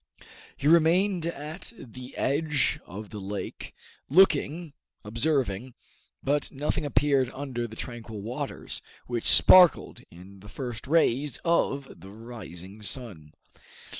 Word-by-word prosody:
He 145 - -1
remained 170 +2 +4
at 160 +4 -6
the 125 +2 -11
edge 150 +1 +1
of 105 +3 -9
the 105 - -6
lake, 100 +1 -6 0.3
looking, 160 -1 +3 0.3
observing; 120 -1 -1 0.5
but 145 +2 0
nothing 150 +2 -2
appeared 140 -3 +2
under 130 -4 -4
the 110 - -11
tranquil 115 -2 -7
waters, 130 +6 -5 0.2
which 120 -2 -3
sparkled 180 -3 +6
in 95 +3 -14
the 105 +2 -13
first 120 0 -6
rays 145 -3 +2
of 140 -5 +1
the 95 +3 -12
rising 105 -3 -10
sun. 100 - -5
130 Hz, 115 wpm, -27 LUFS, 110-150 Hz, 0.5 s, sparkled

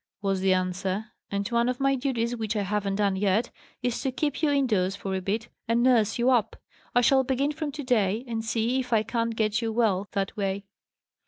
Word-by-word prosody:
was 195 -1 +1
the 190 0 +3
answer; 185 +3 -1 0.2
"and 200 0 -2
one 235 0 +2
of 250 - -2
my 275 0 +3
duties 245 -3 -1
which 220 -2 -3
I 205 - +1
haven't 200 0 -1
done 200 -1 +1
yet, 205 +4 +1 0.3
is 245 -1 -1
to 265 - -1
keep 290 +2 -2
you 310 - +3
indoors 215 -10 +1
for 195 -1 -4
a 190 - -1
bit, 215 +5 -2 0.2
and 230 +1 +2
nurse 230 -4 +3
you 245 +2 +3
up. 225 -4 +2 0.4
I 245 - +6
shall 265 +2 +4
begin 270 +3 0
from 305 -1 -4
to 290 - -5
day, 220 -3 +1
and 225 -1 -3
see 230 +3 0
if 250 -1 -4
I 220 -1 +4
can't 230 +1 -1
get 215 +1 +1
you 225 -1 -1
well, 210 -4 +1
that 195 -1 -2
way." 200 -1 -2
225 Hz, 220 wpm, -27 LUFS, 200-250 Hz, 0.4 s, I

